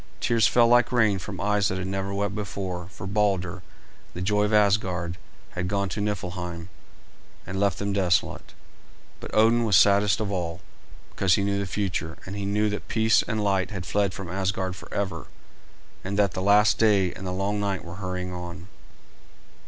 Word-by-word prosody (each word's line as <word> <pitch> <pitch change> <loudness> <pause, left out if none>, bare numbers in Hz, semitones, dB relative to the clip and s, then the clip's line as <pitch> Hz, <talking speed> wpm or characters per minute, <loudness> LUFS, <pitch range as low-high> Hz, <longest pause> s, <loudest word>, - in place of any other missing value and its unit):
Tears 115 -1 +3
fell 120 -1 +4
like 120 0 +4
rain 110 -5 +3
from 95 +1 -7
eyes 105 0 +2
that 95 - -2
had 95 - -3
never 95 +1 -3
wept 100 0 -1
before, 95 -3 -4
for 95 - -9
Balder, 95 -2 0 0.5
the 90 - -4
joy 105 +2 +2
of 105 - -1
Asgard, 95 -5 +2 0.4
had 90 0 -3
gone 100 0 -1
to 105 +3 -3
Niflheim 90 -4 -4 0.8
and 95 0 -4
left 100 -1 +1
them 100 0 -2
desolate. 95 -4 0 0.6
But - - -8
Odin 115 +2 +4
was 105 -4 +3
saddest 100 +2 +5
of 105 -2 -2
all, 85 -2 -3 0.5
because 95 -2 +2
he 100 - 0
knew 100 0 0
the 100 - -2
future, 90 -4 -3
and 95 - -6
he 100 -1 -4
knew 105 +2 +1
that 105 - -5
peace 110 0 +3
and 110 -1 -2
light 95 -2 +1
had 95 -5 -6
fled 100 0 +1
from 95 - -6
Asgard 95 0 -2
forever, 100 +1 -4 0.8
and 100 +1 -3
that 100 -3 +3
the 95 - -4
last 105 +2 +4
day 100 -5 +3
and 95 - -7
the - - -2
long 100 +3 -1
night 100 -3 -2
were 85 +1 -8
hurrying 90 -1 -4
on. 90 +1 -8
100 Hz, 185 wpm, -25 LUFS, 90-105 Hz, 0.8 s, saddest